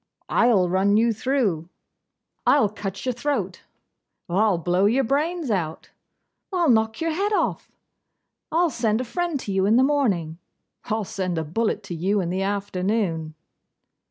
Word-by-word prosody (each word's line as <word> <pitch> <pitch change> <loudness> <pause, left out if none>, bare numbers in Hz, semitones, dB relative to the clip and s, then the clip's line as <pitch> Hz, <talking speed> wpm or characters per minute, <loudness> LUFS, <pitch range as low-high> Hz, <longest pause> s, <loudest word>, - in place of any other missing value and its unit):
'I'll 220 -7 +3
run 195 +3 +2
you 230 +1 +3
through.' 215 - -1 0.8
'I'll 275 -8 +5
cut 195 0 -6
your 255 - 0
throat.' 240 -8 -2 0.7
'I'll 195 +2 +2
blow 180 +3 +2
your 255 +5 +2
brains 295 +3 -1
out.' 165 -6 -3 0.6
'I'll 345 -6 +3
knock 220 +1 +1
your 330 0 0
head 395 +6 -1
off.' - - -1 0.7
'I'll 335 +1 +2
send 225 -3 0
a - - -1
friend 340 +4 -2
to 200 - -5
you 190 0 +1
in 215 - +4
the 255 - +5
morning.' 200 - 0 0.5
'I'll 220 0 -1
send 185 -3 -3
a 160 - 0
bullet 205 +4 -2
into - - -1
you 190 +5 0
in 175 -2 -2
the 185 +1 -1
afternoon. 195 -4 -1
210 Hz, 155 wpm, -24 LUFS, 185-260 Hz, 0.8 s, I'll